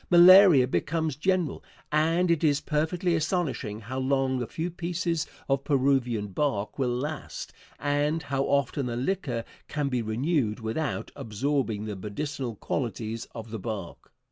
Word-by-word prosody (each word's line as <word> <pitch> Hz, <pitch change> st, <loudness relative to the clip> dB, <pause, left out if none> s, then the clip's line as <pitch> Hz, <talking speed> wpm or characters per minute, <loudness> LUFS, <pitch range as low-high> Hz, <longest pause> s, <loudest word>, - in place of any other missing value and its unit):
Malaria 175 Hz, -5 st, +8 dB
becomes 160 Hz, +2 st, -1 dB
general, 180 Hz, 0 st, 0 dB, 0.3 s
and 165 Hz, +4 st, +3 dB
it 165 Hz, -2 st, +1 dB
is 145 Hz, -2 st, +3 dB
perfectly 170 Hz, +4 st, 0 dB
astonishing 155 Hz, -, -1 dB
how 130 Hz, +5 st, -4 dB
long 130 Hz, -1 st, +1 dB
a 120 Hz, -, -3 dB
few 170 Hz, +2 st, -3 dB
pieces 170 Hz, -2 st, -2 dB, 0.2 s
of 135 Hz, 0 st, +1 dB
Peruvian 130 Hz, -7 st, +1 dB
bark 105 Hz, 0 st, -1 dB
will 130 Hz, -2 st, +1 dB
last, 150 Hz, +3 st, -5 dB, 0.2 s
and 145 Hz, +3 st, 0 dB
how 135 Hz, 0 st, -1 dB
often 140 Hz, -1 st, +1 dB
the 120 Hz, -, -3 dB
liquor 130 Hz, -4 st, -1 dB, 0.2 s
can 145 Hz, -2 st, -1 dB
be 125 Hz, -2 st, 0 dB
renewed 115 Hz, +1 st, 0 dB
without 115 Hz, +7 st, -3 dB
absorbing 115 Hz, -1 st, -1 dB
the 105 Hz, -1 st, -4 dB
medicinal 120 Hz, +5 st, -4 dB
qualities 115 Hz, -1 st, -3 dB
of 115 Hz, -1 st, -7 dB
the 110 Hz, -, -4 dB
bark. 100 Hz, -4 st, -6 dB
140 Hz, 145 wpm, -27 LUFS, 115-160 Hz, 0.3 s, Malaria